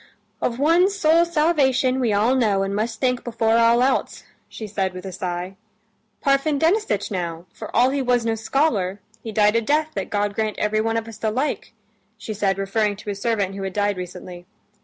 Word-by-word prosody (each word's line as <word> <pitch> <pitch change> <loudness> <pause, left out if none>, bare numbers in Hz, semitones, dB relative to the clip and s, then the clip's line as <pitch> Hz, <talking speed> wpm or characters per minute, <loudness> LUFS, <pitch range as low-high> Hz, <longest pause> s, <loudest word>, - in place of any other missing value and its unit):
"Of 235 - -1
one's 345 +8 +3
soul's 335 0 +3
salvation 275 -5 +2
we 240 -4 +1
all 210 +5 +2
know 210 -7 +2
and 195 0 -2
must 220 +1 -2
think 250 -1 0
before 225 -1 +1
all 235 +1 +4
else," 265 - 0 0.3
she 220 - -7
said 195 -3 -2
with 185 +1 -8
a 190 - -5
sigh. 180 +1 -5 0.7
"Parfen 275 +2 +2
Denisitch 320 - +1
now, 170 -3 -4
for - - -8
all 250 +2 +4
he 280 0 -1
was 245 -2 +1
no 225 - +1
scholar, 220 -5 0 0.2
he 225 - -6
died 210 0 +3
a 230 - +3
death 300 +6 +1
that 195 -2 -4
God 205 0 -1
grant 215 0 -2
everyone 215 +2 0
of 225 0 -3
us 220 -1 -10
the 220 - 0
like," 260 +7 -2 0.4
she 220 - -6
said, 195 -2 0
referring 205 +1 0
to 205 +1 -6
a - - -2
servant 200 -2 -1
who 195 - -6
had 190 -1 -4
died 205 0 0
recently. 180 0 -8
220 Hz, 200 wpm, -22 LUFS, 200-260 Hz, 0.7 s, all